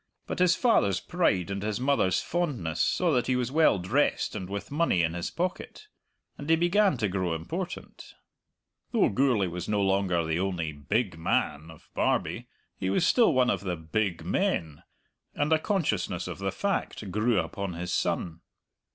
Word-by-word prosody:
But - - -5
his 180 0 +4
father's 100 - +3
pride 100 - 0
and 100 0 -3
his 105 +1 -2
mother's 130 -9 +2
fondness 130 - -2
saw 180 -2 +2
that 125 -4 +1
he 130 - +2
was 125 0 -1
well 155 -6 +4
dressed 105 +11 0
and 95 -1 -5
with 100 +5 -5
money 145 - +2
in 80 0 0
his 85 -1 -3
pocket; 185 - -4 0.5
and 145 - -6
he 165 - +6
began 175 0 +3
to 110 -3 0
grow 90 -3 -1
important. 80 0 -6 0.8
Though - - +4
Gourlay 120 -3 +2
was 90 0 -5
no 105 -1 +1
longer 95 -3 +1
the 80 +1 -1
only 90 -4 -2
"big 90 - -2
man" 80 -1 -1
of 80 - -15
Barbie, - - 0 0.3
he 95 - -1
was 100 - +2
still 235 +4 +5
one 125 -1 +3
of 95 - -2
the 90 -3 -2
"big 85 +3 -2
men," 75 -3 -1 0.5
and 145 +2 +1
a 160 - +4
consciousness 155 - -1
of - - -6
the 95 0 -1
fact 150 - -2
grew 110 +3 +1
upon 90 +3 -2
his 85 +1 -4
son. 85 -1 -1
100 Hz, 175 wpm, -28 LUFS, 90-145 Hz, 0.8 s, he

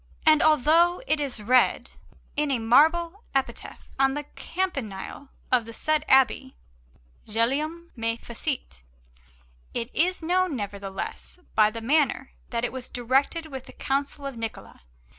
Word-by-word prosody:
And 310 -1 +6
although 320 - +4
it 310 -11 +1
is 265 -7 -3
read 250 +3 +3 0.4
in 300 0 +1
a 270 - +2
marble 325 - +3
epitaph 270 -1 -3
on 270 0 +4
the 295 - -3
campanile 275 - -4 0.2
of 245 -3 +3
the 230 - -9
said 310 +3 +1
abbey, 265 0 +3 0.7
GUGLIELM. 295 +10 0
ME 230 -1 -1
FECIT, 235 - -5 0.9
it 230 +2 -3
is 360 +1 +1
known, 360 -1 +1
nevertheless, 200 - -6 0.2
by 215 -1 +5
the 230 +1 -7
manner, 270 +1 +1 0.2
that 235 0 -1
it - - -4
was 255 -1 -6
directed 270 +7 0
with 265 -1 -7
the - - -12
counsel 280 +1 -2
of 275 -2 -4
Niccola. 225 - -7
270 Hz, 140 wpm, -26 LUFS, 230-310 Hz, 0.9 s, And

